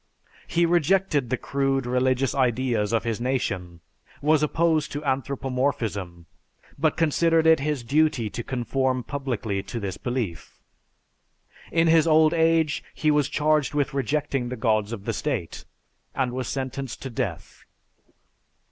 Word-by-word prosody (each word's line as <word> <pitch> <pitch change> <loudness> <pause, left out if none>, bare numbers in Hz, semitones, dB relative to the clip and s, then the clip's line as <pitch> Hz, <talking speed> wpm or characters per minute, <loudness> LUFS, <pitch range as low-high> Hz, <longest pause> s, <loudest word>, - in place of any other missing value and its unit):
He 170 0 +2
rejected 170 -5 +2
the 130 - 0
crude 135 +1 -1
religious 130 +1 +1
ideas 120 -4 +1
of 115 -1 +1
his 115 -1 -2
nation, 95 -9 -2 0.4
was 150 +1 +3
opposed 160 0 +1
to 145 +1 -5
anthropomorphism, 125 -9 -2 0.5
but - - +1
considered 165 +1 +2
it 160 -2 +6
his 145 -2 -2
duty 140 -3 +2
to 120 +3 -5
conform 130 +1 -1
publicly 120 -7 -3
to 115 - -6
this 100 -3 -4
belief. 120 - -4 1.1
In 165 0 +3
his 165 -1 +4
old 155 0 +5
age, 160 -2 +2
he 155 -1 +2
was 150 -2 +2
charged 150 -2 +1
with 145 -1 0
rejecting 135 -1 -1
the 125 - -4
gods 110 -2 +1
of 105 -4 -6
the - - -1
state, 125 - -3 0.5
and 130 -2 0
was 130 +1 -4
sentenced 135 -1 -4
to 135 - -5
death. 115 - -5
135 Hz, 140 wpm, -25 LUFS, 120-150 Hz, 1.1 s, it